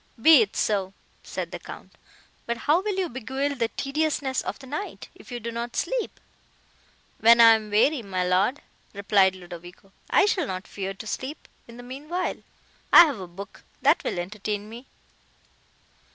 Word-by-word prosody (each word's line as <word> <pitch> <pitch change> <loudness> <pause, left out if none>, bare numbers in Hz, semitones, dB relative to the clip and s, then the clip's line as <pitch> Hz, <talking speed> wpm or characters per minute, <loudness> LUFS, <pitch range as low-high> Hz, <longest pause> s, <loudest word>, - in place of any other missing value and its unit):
"Be 310 +2 +8
it 210 -2 -1
so," 195 -3 0 0.3
said - - -6
the - - -6
Count; - - -11 0.6
"but 235 0 -1
how 315 +5 +4
will 410 0 -2
you 375 -2 0
beguile 265 +2 -3
the 240 -4 -1
tediousness 275 0 -1
of - - -5
the 275 - -13
night, 300 +10 -6
if - - -16
you 245 - -4
do 235 +1 -5
not 235 +1 -5
sleep?" - - -2 1.0
"When 230 +1 +6
I 230 -1 +9
am 215 -1 -2
weary, 240 +7 +3
my 190 -4 -2
Lord," 190 +9 +1 0.3
replied 200 -1 +3
Ludovico, 175 +1 -12 0.2
"I - - +4
shall 370 -7 0
not 185 +1 -5
fear 195 -1 -5
to 220 - -10
sleep; 260 +7 -6 0.2
in 235 0 -13
the 245 - -10
meanwhile, 295 +8 -4 0.5
I 345 - +10
have 285 -9 -3
a 185 - -7
book 195 +3 -11 0.2
that 290 +5 +4
will - - -3
entertain 205 +3 -4
me." 235 +4 -11
235 Hz, 170 wpm, -25 LUFS, 200-285 Hz, 1.0 s, I